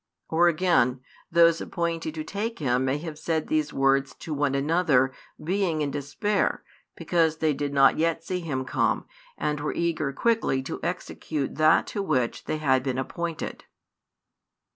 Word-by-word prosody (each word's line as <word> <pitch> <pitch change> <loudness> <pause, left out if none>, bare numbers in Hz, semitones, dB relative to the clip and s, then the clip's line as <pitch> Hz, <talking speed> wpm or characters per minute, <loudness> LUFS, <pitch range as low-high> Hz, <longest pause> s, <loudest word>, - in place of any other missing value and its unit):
Or 170 +2 +4
again, 160 -7 +2 0.3
those 165 0 +5
appointed 165 -2 -3
to 155 - -3
take 220 +7 -4
Him 130 -3 +1
may 135 +2 +1
have 155 -1 -7
said 160 -1 -1
these 155 -2 0
words 135 0 +2
to 160 - -6
one 145 -1 0
another, 140 -3 +2 0.3
being 175 -3 0
in 140 - -2
despair, 145 +9 -1 0.3
because 165 -3 +1
they 155 -1 +1
did 145 0 -3
not 135 +1 +5
yet 165 0 +1
see 180 +2 -2
Him 135 -6 -3
come, - - 0 0.3
and 150 0 -1
were 150 - -3
eager 160 -4 0
quickly 215 - +1
to - - -5
execute 145 -4 -3
that 155 0 +5
to 205 - -4
which 130 -11 -1
they 155 - -2
had 135 -4 +2
been 130 -1 -2
appointed. 165 +5 -4
155 Hz, 160 wpm, -26 LUFS, 135-170 Hz, 0.3 s, those